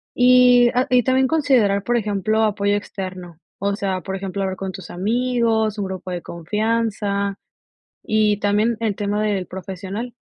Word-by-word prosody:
Y, 250 -1 +6
ah, 255 +2 +2
y 250 -2 +4
también 260 0 +2
considerar, 245 -10 +2
por 240 0 +1
ejemplo, 215 0 0
apoyo 205 -1 +1
externo, 185 -4 -6 0.2
o 200 +1 0
sea, 190 -2 -2
por 190 +1 -5
ejemplo, 195 0 -4
hablar 190 0 -2
con 190 0 -5
tus 185 -2 -10
amigos, 225 +2 0
un 205 - -2
grupo 185 -1 -6
de 175 -1 -4
confianza, 205 +2 -1 0.7
y 215 -1 +2
también 210 +3 +1
el 215 -3 0
tema 205 +1 -1
del 200 -4 -1
profesional. 190 +5 -6
205 Hz, 160 wpm, -21 LUFS, 195-230 Hz, 0.7 s, Y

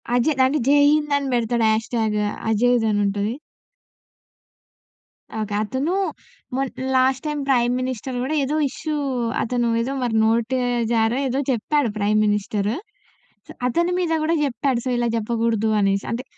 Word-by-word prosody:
అజయ్ 260 +5 +2
దాన్ని 265 +4 +3
జై 285 +1 +5
హింద్ 295 -1 +1
అని 280 -1 -3
బెడతాడు 235 -1 +1
హాష్‌టాగ్. 220 -1 0 0.3
అజయేజ్ 235 +1 +2
అనుంటది. 205 +1 0 2.0
ఓకే. 215 -1 -3
అతను 265 - -2 0.6
మొన్ 270 0 -1 0.3
లాస్ట్‌టైమ్ 265 +3 +1
ప్రైమ్ 245 -2 +3
మినిస్టర్ 255 0 -4
గూడా 280 +5 -1
ఏదో 280 +3 -1
ఇష్యూ 310 +3 -5 0.5
అతను 240 0 0
ఏదో 260 +4 -2
మరి 235 -2 -1
నోటి 230 +3 +1 0.4
జారో 225 +2 +2
ఏదో 260 +2 -1
చెప్పాడు 260 +3 0
ప్రైమ్ 210 +1 +2
మినిస్టర్. 205 0 0 1.0
అతని 340 +7 +1
మీద 340 -3 0
కూడా 320 +2 +1
జేప్పాడు. 265 -2 0
సో - - -1
ఇలా 240 0 +1
జెప్పకూడదు 225 -1 0
అనేసి. 195 0 +1
అంటే 235 +2 -3
240 Hz, 130 wpm, -22 LUFS, 220-270 Hz, 2.0 s, జై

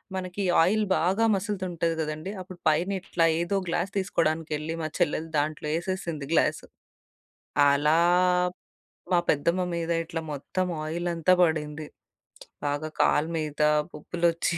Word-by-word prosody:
మనకి 185 +1 -3 0.2
ఆయిల్ 215 +5 +2
బాగా 190 +7 +2
మసులుతుంటది 185 -5 -2
గదండీ! 155 +4 -4
అప్పుడు 185 -1 -11
పైన 170 +5 +1
ఇట్లా 170 -3 +1 0.2
ఏదో 175 +3 0
గ్లాస్ 175 +3 -1
తీసుకోవడానికెళ్లి 160 -4 -1
మా - - -1
చెల్లెలు 165 -1 0
దాంట్లో 150 0 -2
యేసేసింది 170 -4 -3
గ్లాసు. - - +2 1.1
అలా 150 +3 +3 1.2
మా 175 - +5
పెద్దమ్మ 170 +5 +2
మీద 170 0 -2
ఇట్లా 165 0 -4
మొత్తం 185 +6 -2 0.2
ఆయిలంతా 170 +2 +1
పడింది. 155 -2 -1 0.8
బాగా 145 +2 -1
కాళ్ళ 150 - +3
మీద 155 -1 -3 0.3
పొక్కులొచ్చి 170 +2 0
165 Hz, 115 wpm, -27 LUFS, 155-185 Hz, 1.2 s, మా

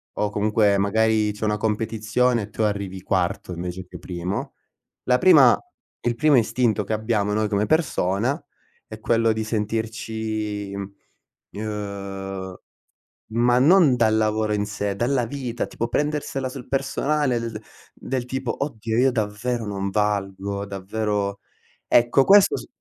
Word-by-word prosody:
o 105 - 0
comunque, 105 -1 +2
magari 110 +1 +2
c'è 105 +1 -4
una 105 0 +1
competizione 110 +3 0
e 100 - -8
tu 110 - -2
arrivi 100 -3 -2
quarto 90 -1 -1
invece 90 +1 -5
che 90 -1 -10
primo. 90 +2 -4 0.5
La 125 0 +3
prima 150 -9 +7 0.4
il 120 -1 0
primo 145 +2 +4
istinto 115 -2 +1
che 110 - -3
abbiamo 105 -2 0
noi 110 0 +1
come 105 0 0
persona, 135 - 0 0.4
è 110 0 -10
quello 115 0 +2
di 110 0 -2
sentirci, 110 -1 -3
mhmm, 100 0 -6 0.6
ehm 100 -3 -5 0.7
ma 120 +2 +3
non 150 -1 +6
dal 110 -2 +3
lavoro 110 0 +1
in 105 0 -1
sé, 105 -1 -3
dalla 120 +3 +1
vita 120 -1 -4
tipo 115 - -4
prendersela 145 0 -1
sul 130 -1 -8
personale 135 -1 0
l 115 0 -3
d - - -8 0.3
del 130 -2 -3
tipo: 130 0 -3
"Oddio 115 -4 -2
io 130 +1 +4
davvero 115 +1 -2
non 100 -1 -3
valgo, 100 -1 -1
davvero" 100 +1 -2 0.5
Ecco, 120 +3 +4
questo 200 0 +6
s - - -8
110 Hz, 140 wpm, -23 LUFS, 100-120 Hz, 0.7 s, prima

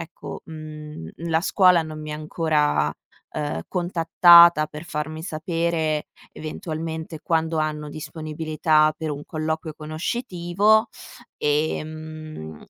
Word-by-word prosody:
ecco, 165 - -8
mhmm, 155 - -8 0.2
la 160 0 +3
scuola 180 -2 +4
non 155 -1 -7
mi 155 0 -6
ha - - -4
ancora, 155 -1 +1 0.4
ehm, 145 - -2
contattata 170 -2 +6
per 150 +2 -9
farmi 155 -1 -4
sapere 160 -2 -1 0.3
eventualmente 160 0 -5
quando 160 0 0
hanno 150 -1 -2
disponibilità 155 0 0
per 160 -1 -3
un 145 0 -5
colloquio 160 0 -3
conoscitivo, 185 +6 +1 0.5
ehm, 155 - -3
155 Hz, 105 wpm, -23 LUFS, 155-165 Hz, 0.5 s, contattata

